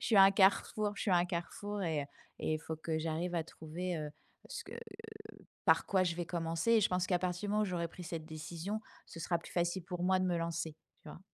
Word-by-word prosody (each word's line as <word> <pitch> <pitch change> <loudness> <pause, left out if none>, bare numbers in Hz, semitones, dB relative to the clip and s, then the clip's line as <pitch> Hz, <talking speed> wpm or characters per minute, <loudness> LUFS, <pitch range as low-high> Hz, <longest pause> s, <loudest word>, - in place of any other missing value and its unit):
je - - -3
suis 225 - +4
à 195 - +11
un 195 - +8
carrefour 205 +2 +3
je - - -3
suis 200 - +1
à - - +7
un 175 - +4
carrefour 200 +4 -3
et 160 -5 +1
heu - - -5 0.4
et 155 - +1
il - - -1
faut 160 - -4
que 160 0 -2
j'arrive 165 +2 -1
à 160 - 0
trouver, 170 +3 -4
heu, 150 -1 -3 0.4
ce - - -5
que, - - -10
heu, 425 -1 -11 0.2
par - - +5
quoi 190 -2 +3
je 170 -2 0
vais 175 -1 -2
commencer 165 +5 0
et 225 - +7
je 200 - +4
pense 180 0 +1
qu'à 180 -2 +2
partir 180 +2 -1
du - - 0
moment 215 0 +3
où - - +3
j'aurai 175 -3 -1
pris 180 - -10
cette 165 -1 -4
décision, 165 +6 -4 0.3
ce 165 - -9
sera 170 +1 +1
plus 165 - -12
facile 175 +1 0
pour 175 -1 -4
moi 185 +1 +4
de 185 - +1
me 175 -2 +2
lancer, 165 -1 -2 0.3
tu - - -11
vois? - - -10
175 Hz, 270 wpm, -34 LUFS, 165-195 Hz, 0.4 s, à